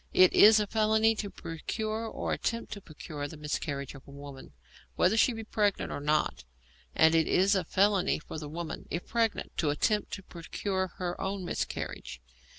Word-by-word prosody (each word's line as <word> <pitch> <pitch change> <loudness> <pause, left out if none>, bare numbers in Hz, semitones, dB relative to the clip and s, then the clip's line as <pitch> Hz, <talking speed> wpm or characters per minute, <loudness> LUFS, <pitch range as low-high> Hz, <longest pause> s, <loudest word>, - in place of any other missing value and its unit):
It 185 -1 +7
is 215 +1 +8
a 210 - +1
felony 220 +1 +3
to 205 - -3
procure 215 +7 -4
or - - -3
attempt 230 -1 -2
to 205 - -8
procure 150 -3 -7
the 155 - -10
miscarriage 145 -2 -3
of 135 - -11
a - - -13
woman, 140 - -10 0.4
whether 185 +4 +3
she 225 - +4
be 225 -1 -6
pregnant 210 -2 0
or - - -3
not, 150 - 0 0.5
and 160 0 +5
it 165 -1 +3
is 195 +2 +4
a 190 -2 +2
felony 195 +2 +2
for 155 - -8
the 150 -1 -7
woman, 165 +1 -6
if 170 - -3
pregnant, 230 -2 -1
to 155 - +1
attempt 210 +8 +1
to 195 - -5
procure 190 +2 -3
her 175 -1 -3
own 190 -1 -3
miscarriage. 65 - -4
185 Hz, 180 wpm, -30 LUFS, 155-215 Hz, 0.5 s, is